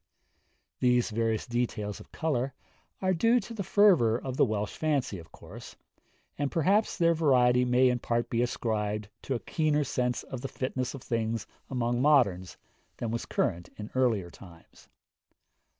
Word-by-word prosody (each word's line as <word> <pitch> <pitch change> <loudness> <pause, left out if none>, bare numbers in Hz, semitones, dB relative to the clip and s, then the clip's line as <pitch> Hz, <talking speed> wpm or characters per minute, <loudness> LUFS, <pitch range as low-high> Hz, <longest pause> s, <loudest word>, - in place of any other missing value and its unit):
These 125 -2 +2
various 110 0 0
details 120 -4 -2
of - - -15
colour 135 -4 -1 0.5
are 185 0 +3
due 230 +8 +3
to 230 - -9
the 220 - -4
fervour 175 - +4
of 130 0 -5
the - - +4
Welsh 105 -3 -3
fancy, 140 - -1
of 80 -1 -14
course, - - -12 0.6
and 145 -1 0
perhaps 195 +7 +2
their 170 -2 +4
variety 125 -6 +3
may 125 +1 +4
in 125 -1 +1
part 120 0 -1
be 115 - 0
ascribed 105 -3 -2
to 135 - -2
a - - -2
keener 150 +1 0
sense 125 -3 -1
of 130 -2 -7
the 135 - -3
fitness 130 0 -3
of 135 - -10
things 115 -2 -2 0.2
among 120 -1 0
moderns 120 -12 +3 0.4
than 115 - -3
was 115 - -3
current 85 +1 -1
in 105 0 -7
earlier 115 -9 +1
times. 85 -3 -16
125 Hz, 160 wpm, -29 LUFS, 110-140 Hz, 0.6 s, fervour